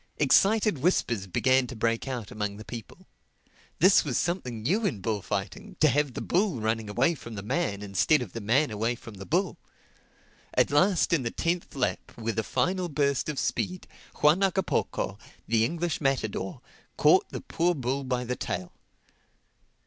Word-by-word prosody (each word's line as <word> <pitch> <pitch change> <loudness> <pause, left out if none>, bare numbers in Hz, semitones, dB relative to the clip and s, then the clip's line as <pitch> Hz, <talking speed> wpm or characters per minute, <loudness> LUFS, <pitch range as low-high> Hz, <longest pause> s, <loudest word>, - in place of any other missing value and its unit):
Excited 200 +4 +4
whispers 120 - +1
began 130 +7 +2
to 125 - -8
break 115 +3 0
out 125 -5 -4
among 105 -3 -3
the 110 - -10
people. 115 -3 -9 0.7
This 185 +4 +6
was 135 -5 -1
something 125 - -2
new 195 - +1
in 145 - 0
bullfighting, 100 - -3
to - - +6
have 145 -3 +1
the - - -3
bull 185 - +1
running 110 0 -1
away 125 +10 +2
from 115 -7 -9
the 100 - -6
man, 100 -1 -1
instead 105 +9 +2
of 105 - -11
the 115 - -5
man 120 +6 +2
away 110 +3 -1
from 115 -1 -11
the 95 -2 -10
bull. - - 0 1.0
At - - +3
last 170 +4 +3
in 160 - +3
the 120 - -2
tenth 170 +6 -2
lap, 130 -2 -2
with 115 -1 -2
a - - 0
final 180 - 0
burst 140 -1 0
of 150 - -3
speed, 185 +6 -2 0.3
Juan 150 +6 +5
Hagapoco, 190 0 0 0.3
the 115 -1 +3
English 165 +6 -1
matador, 110 -9 -1 0.4
caught - - +5
the - - -6
poor 175 +1 0
bull 135 0 -2
by 125 -1 -1
the 125 +1 -2
tail. 90 -6 -4
125 Hz, 170 wpm, -27 LUFS, 110-160 Hz, 1.0 s, This